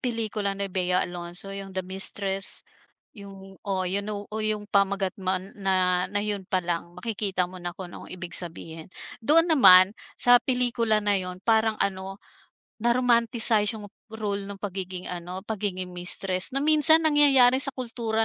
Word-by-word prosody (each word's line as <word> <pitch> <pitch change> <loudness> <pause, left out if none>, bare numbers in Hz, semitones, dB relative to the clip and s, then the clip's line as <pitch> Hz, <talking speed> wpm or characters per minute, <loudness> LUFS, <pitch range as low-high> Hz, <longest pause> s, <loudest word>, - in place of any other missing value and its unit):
pelikula 220 -5 -2
ni 200 0 -3
Bea 180 -1 +1
Alonzo, 175 +2 -8
'yong 195 -1 -8
"The 185 - -2
Mistress." 195 +1 -1 0.5
'Yong 195 -2 -13
oo, 190 -2 -2
you 190 +3 -1
know, 205 0 -6
oh, 220 - -3
'yong 215 -1 -1
pamagat 200 -1 +1
man 185 +1 -3
na 185 -2 +1
na 205 - -2
'yon 200 -3 -3
pa 185 -2 -1
lang. 170 0 -4
Makikita 195 -2 -2
mo 185 0 -11
na 175 0 -6
kung 180 -2 -9
anong - - -11
ibig 180 -1 -8
sabihin. 165 -2 -5 0.3
Doon 325 +8 +4
naman 190 -9 +7 0.2
sa 245 0 +5
pelikula 235 -4 0
na 205 -2 +2
'yon, 180 0 -6
parang, 220 -1 +2
ano, 190 0 -2 0.6
na-romanticize 235 -2 +2
'yong 205 -1 -10 0.2
role 205 -2 -4
ng 200 - -7
pagiging 185 -2 -5
ano, 180 +2 -7
pagiging 190 -4 -4
mistress. 185 +1 -2
Na 275 - 0
minsan 310 +1 +5
nangyayari 275 -4 +6
sa 275 - +5
kultura 230 -3 -2
200 Hz, 160 wpm, -25 LUFS, 185-225 Hz, 0.6 s, naman